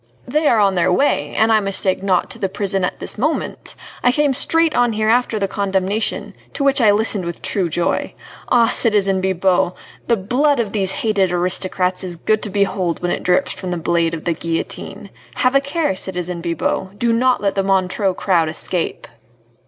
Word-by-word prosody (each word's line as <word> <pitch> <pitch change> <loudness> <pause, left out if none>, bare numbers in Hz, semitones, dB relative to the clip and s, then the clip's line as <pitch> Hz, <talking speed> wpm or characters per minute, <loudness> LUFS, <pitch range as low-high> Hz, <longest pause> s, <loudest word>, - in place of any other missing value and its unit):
"They 300 +4 +1
are 235 - +4
on 200 -2 +3
their 180 0 +1
way, 180 - +1
an 220 +1 +3
I 220 - +5
mistake 195 -2 0
not, 190 -2 0
to 230 - -8
the 195 -3 -1
prison 195 -1 -2
at 180 - -2
this - - -3
moment. 305 +7 -2 0.3
I 245 - +5
came 290 +1 +1
straight 325 +4 +4
on 245 -2 +2
here 215 0 0
after 240 -1 +2
the 200 -1 -1
condemnation, 200 +2 -1 0.2
to 280 - -2
which 275 -1 +3
I 220 - +5
listened 205 -1 +2
with 170 -1 -6
true 185 -4 -1
joy. 170 +2 -2 0.3
Ah, 235 -2 +4
citizen 200 -4 +2
Bibot! 185 -1 +1 0.3
the 235 - +2
blood 260 +8 +1
of 220 -4 -1
these 195 -3 +1
hated 200 -5 0
aristocrats 180 +1 -1
is 180 -2 -5
good 215 +6 0
to - - -3
behold 190 -3 -1
when 175 - 0
it - - -2
drips 180 0 +1
from 185 - -6
the 175 - -2
blade 165 0 0
of 160 - -9
the 170 - +1
guillotine. 165 +1 -5 0.2
Have 255 0 +1
a 275 - +4
care, 280 - -1
citizen 180 -2 -4
Bibot, 185 +3 -3
do 235 +1 +1
not 250 +2 +2
let 200 -1 0
the 195 - 0
Montreux 190 0 0
crowd 170 -5 +1
escape!" 165 +2 -3
195 Hz, 195 wpm, -18 LUFS, 180-230 Hz, 0.3 s, I